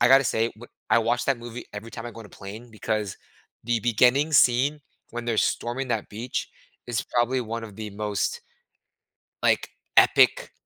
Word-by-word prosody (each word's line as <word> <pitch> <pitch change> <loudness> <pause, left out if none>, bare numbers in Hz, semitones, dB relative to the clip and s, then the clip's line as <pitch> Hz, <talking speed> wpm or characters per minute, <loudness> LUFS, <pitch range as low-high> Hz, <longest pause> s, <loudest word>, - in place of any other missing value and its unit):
I 120 - +6
gotta 135 +1 +7
say, 115 0 +1
w 120 +2 -13 0.2
I - - +6
watch 120 +2 +1
that 135 -3 +2
movie 120 0 -8
every 105 +2 -7
time 115 0 -7
I 120 - -5
go 115 - -10
on 110 - -10
a - - -17
plane, 105 +6 -10
because 105 -2 -2 0.5
the 120 -1 +1
beginning 125 +7 +3
scene 135 +2 +4 0.3
when 120 0 -5
they're 115 -2 0
storming 125 +3 0
that 110 -3 -1
beach 115 +4 -4 0.4
is 120 0 -1
probably 125 +2 +1
one 115 -1 -4
of 105 -3 -11
the 110 -1 -6
most, 105 0 -2 1.0
like, - - +2 0.3
epic - - +5
120 Hz, 180 wpm, -25 LUFS, 110-125 Hz, 1.0 s, gotta